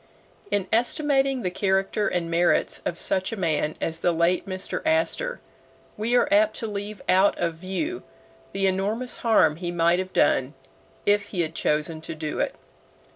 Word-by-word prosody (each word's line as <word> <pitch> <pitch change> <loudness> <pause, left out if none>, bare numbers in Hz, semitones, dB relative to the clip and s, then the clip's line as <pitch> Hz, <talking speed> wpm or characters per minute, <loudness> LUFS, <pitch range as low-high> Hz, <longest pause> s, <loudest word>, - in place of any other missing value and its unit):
In 200 -2 0
estimating 270 +1 +2
the 180 - -1
character 195 +2 0
and 175 -2 -1
merits 170 +1 +2
of 170 - -3
such 185 +2 0
a 225 - -4
man 155 -4 0
as 165 0 -2
the 175 - +2
late 170 +3 +1
Mr. 185 0 -3
Astor, 325 +10 0 0.5
we 225 +4 0
are 245 - +4
apt 215 +1 +4
to - - -3
leave 205 0 -5
out 190 +2 +4
of 170 -1 -1
view 190 - -4 0.5
the 195 0 0
enormous 205 +6 -1
harm 160 -10 +3
he 175 0 -4
might 170 +1 +2
have 185 0 -4
done 130 -3 +2 0.5
if 205 0 +3
he 190 -3 -2
had 160 -1 -2
chosen 155 +1 -1
to 165 0 -6
do 155 -1 -4
it. - - -1
190 Hz, 170 wpm, -25 LUFS, 170-215 Hz, 0.5 s, are